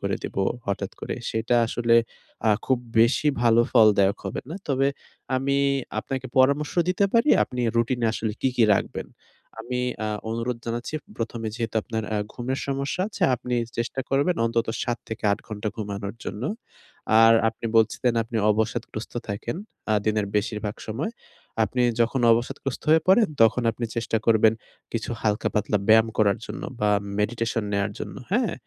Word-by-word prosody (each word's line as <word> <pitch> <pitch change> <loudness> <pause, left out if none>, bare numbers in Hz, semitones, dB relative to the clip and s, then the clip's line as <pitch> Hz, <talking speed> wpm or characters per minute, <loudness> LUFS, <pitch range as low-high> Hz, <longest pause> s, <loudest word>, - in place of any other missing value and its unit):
করে - - -1
দিবো 95 - -2 0.2
হঠাৎ 100 - -2
করে। - - -3 0.2
সেটা 115 +2 +1
আসলে 115 0 +1 0.5
আ - - +6 0.2
খুব 130 -2 +2 0.2
বেশি 125 +6 +3
ভালো 115 0 +5
ফলদায়ক 105 -4 +5
হবে - - -3
না। 165 - -4
তবে 135 0 +2 0.5
আমি 140 +1 0 0.4
আপনাকে 130 +3 -4
পরামর্শ 140 +3 +3 0.2
দিতে 185 +2 +2
পারি, 230 +5 +3
আপনি 125 0 -4 0.2
routine 120 +1 +1
এ - - +4
আসলে 110 -2 -2
কী, 130 - +2
কী 115 - +5
রাখবেন। - - -3 0.5
আমি 125 +1 -3 0.3
আ - - -1 0.2
অনুরোধ 115 +1 -2
জানাচ্ছি 120 +6 -4 0.2
১ম 115 0 -4
এ - - 0
যেহেতু 115 -2 -3
আপনার 110 -1 -3
আ - - +1 0.2
ঘুমের 130 +2 -3
সমস্যা 140 +5 -2
আছে 200 - -7
আপনি 125 +1 -4 0.2
চেষ্টা 120 +3 -2
করবেন 145 +6 +2
অন্তত 115 0 0 0.2
৭ 120 -1 -2
থেকে 110 -1 -6
৮ - - -1
ঘন্টা 110 0 -3
ঘুমানোর 100 -1 -4
জন্য। 105 - -5 0.8
আর 115 0 +8 0.2
আপনি 115 - -8
বলছিলেন 115 +2 +3
আপনি 115 0 -5
অবসাদগ্রস্ত 110 0 -2 0.2
থাকেন 105 +7 -3 0.4
আ - - +4
দিনের 105 -1 +1
বেশিরভাগ 105 0 -2
সময়। 130 - -3 0.5
আপনি 125 +4 -1 0.2
যখন 120 +3 +2
অবসাদগ্রস্ত 130 +3 -2
হয়ে 160 0 +5
পড়েন 215 +1 +6
তখন 115 +2 +4
আপনি 115 +2 -5
চেষ্টা 115 -1 0
করবেন 110 -1 +5 0.4
কিছু 115 0 -3
হালকা-পাতলা 105 0 0
ব্যায়াম 110 +1 +6
করার 100 -2 +3
জন্য - - -7 0.2
বা 105 0 +3 0.3
meditation 115 +1 -1
নেয়ার 100 0 0
জন্য। - - -6 0.2
হ্যাঁ? - - +2
115 Hz, 160 wpm, -25 LUFS, 110-130 Hz, 0.8 s, আর